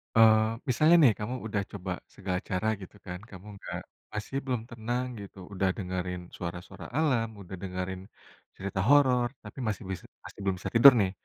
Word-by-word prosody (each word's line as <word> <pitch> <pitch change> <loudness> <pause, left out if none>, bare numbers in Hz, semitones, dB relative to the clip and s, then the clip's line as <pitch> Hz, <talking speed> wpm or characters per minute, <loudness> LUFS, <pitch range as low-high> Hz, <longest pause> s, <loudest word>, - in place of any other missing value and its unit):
eee, 110 -1 +8 0.3
misalnya 155 +7 +6
nih, 120 -6 +7
kamu 110 +4 -3
udah 105 -1 0
coba 95 -2 -5 0.2
segala 95 -2 -2
cara 90 +4 0
gitu 95 - -11
kan, 90 -2 -5
kamu 95 +2 -11
enggak - - -5 0.3
masih 105 +5 -4
belum 125 -4 0
tenang 120 +2 -2 0.2
gitu, 100 0 -11 0.2
udah 95 0 +1
dengerin 90 -2 -3 0.2
suara-suara 85 0 -6
alam, 130 -8 +2
udah 95 0 -7
dengerin 90 0 -4 0.5
cerita 95 0 -4
horor, 130 -4 +5 0.2
tapi 105 +5 -10
masih 110 0 -2
bis 95 -2 -3 0.2
masih - - -11
belum 95 -1 +1
bisa - - -4
tidur, 125 +4 +11
nih. 95 -1 +1
100 Hz, 170 wpm, -29 LUFS, 95-120 Hz, 0.5 s, tidur